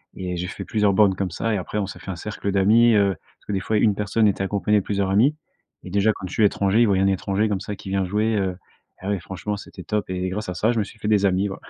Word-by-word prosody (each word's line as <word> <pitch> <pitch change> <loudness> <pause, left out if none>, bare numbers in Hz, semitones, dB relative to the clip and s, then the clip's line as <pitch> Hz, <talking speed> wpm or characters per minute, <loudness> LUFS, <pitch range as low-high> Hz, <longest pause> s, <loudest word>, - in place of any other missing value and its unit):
et 90 -1 -4
j'ai 90 +1 -3
fait - - -7
plusieurs 105 -2 +2
bornes 95 -1 +4
comme 95 0 -2
ça 115 +6 -1
et - - +1
après 95 +3 -4
on 105 - 0
s'est 95 - -9
fait - - -10
un - - -5
cercle 100 +2 -4
d'amis, 110 +5 +5
heu, 100 -1 +4
parce - - -32
que - - -3
des 95 - 0
fois 110 +3 0
une 105 0 +3
personne 105 +2 +1
était 100 -1 0
accompagnée 100 +1 +1
de - - -6
plusieurs 100 -1 -1
amis. 115 +10 +4 0.5
Et 90 - -9
déjà, 100 +3 +3
quand 95 - -7
je 90 - -9
suis 110 - +2
étranger, 100 +1 +3
ils 120 - +5
voyaient 95 -2 +2
un - - +3
étranger 95 +2 0
comme 100 -3 -1
ça 105 - -5
qui 95 - -10
vient 95 0 0
jouer. 105 +4 0
Heu, 95 -3 -1 0.4
ah 95 - -5
oui, 100 - 0
franchement, 95 +4 -5
c'était 105 - -10
top. 105 -2 -2
Et 95 0 -2
grâce 105 +2 -4
à 90 - -4
ça, 110 +6 +2
je 115 - 0
me - - +2
suis 105 - -12
fait 105 - -4
des 105 -2 +3
amis, 95 +2 +1
ouais. 95 - -5
100 Hz, 305 wpm, -23 LUFS, 95-105 Hz, 0.5 s, d'amis